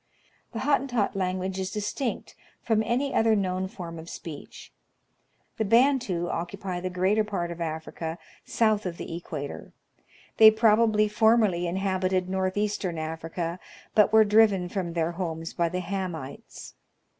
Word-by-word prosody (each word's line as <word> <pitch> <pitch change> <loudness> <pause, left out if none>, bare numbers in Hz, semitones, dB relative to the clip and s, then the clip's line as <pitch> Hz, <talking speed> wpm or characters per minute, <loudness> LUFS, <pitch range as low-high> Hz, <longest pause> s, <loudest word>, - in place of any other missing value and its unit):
The 225 - -5
Hottentot 260 -7 +1
language 185 0 -2
is 190 0 -2
distinct 210 +6 -3 0.3
from 220 -2 +2
any 255 +5 -1
other 225 -1 +3
known 185 -2 -1
form 170 -3 -8
of 165 +1 -10
speech. 150 - -9 0.8
The - - +1
Bantu 230 -6 +2
occupy 180 +2 -4
the 185 +1 -3
greater 190 +4 +2
part 185 -5 -3
of 170 0 -7
Africa 160 0 -4 0.3
south 215 -3 +1
of 170 -1 -5
the 165 - -6
equator. 155 -4 -7 0.6
They 220 -1 +10
probably 220 -1 +3
formerly 210 -5 +3
inhabited 185 0 0
north 190 0 -1
eastern 205 -4 -1
Africa, 165 +2 -4 0.3
but 210 - +5
were 220 0 +6
driven 205 -4 +4
from 180 -3 -3
their 165 0 0
homes 165 -2 -4
by 170 -1 0
the 180 +2 -3
Hamites. 175 -7 -6
190 Hz, 140 wpm, -27 LUFS, 170-215 Hz, 0.8 s, They